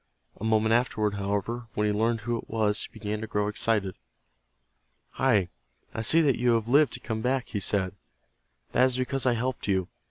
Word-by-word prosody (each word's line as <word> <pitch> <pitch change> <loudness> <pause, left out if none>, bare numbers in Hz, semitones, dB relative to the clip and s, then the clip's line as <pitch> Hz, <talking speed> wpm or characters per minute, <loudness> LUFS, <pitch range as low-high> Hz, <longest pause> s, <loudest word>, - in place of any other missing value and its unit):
A - - -10
moment 110 0 +2
afterward, 110 -3 +1
however, 105 +4 -3
when 105 - +1
he 105 - +1
learned 115 +2 0
who 120 +2 -2
it - - -7
was 110 -2 0
he - - -15
began 105 0 -4
to 110 - -5
grow 105 -2 -1
excited. 105 -2 0 1.2
"Hi, 95 -4 +2 0.4
I 110 - -3
see 160 +9 +5
that 140 -5 +2
you 120 0 +3
have 115 -1 0
lived 145 +4 +4
to - - -1
come 110 -2 -4
back," 130 +2 -1
he 105 - -2
said. 95 -1 0 0.8
"That 130 - +4
is 130 -1 0
because 130 +1 -1
I 125 - +4
helped 125 0 -3
you. 95 -3 0
110 Hz, 195 wpm, -27 LUFS, 105-120 Hz, 1.2 s, see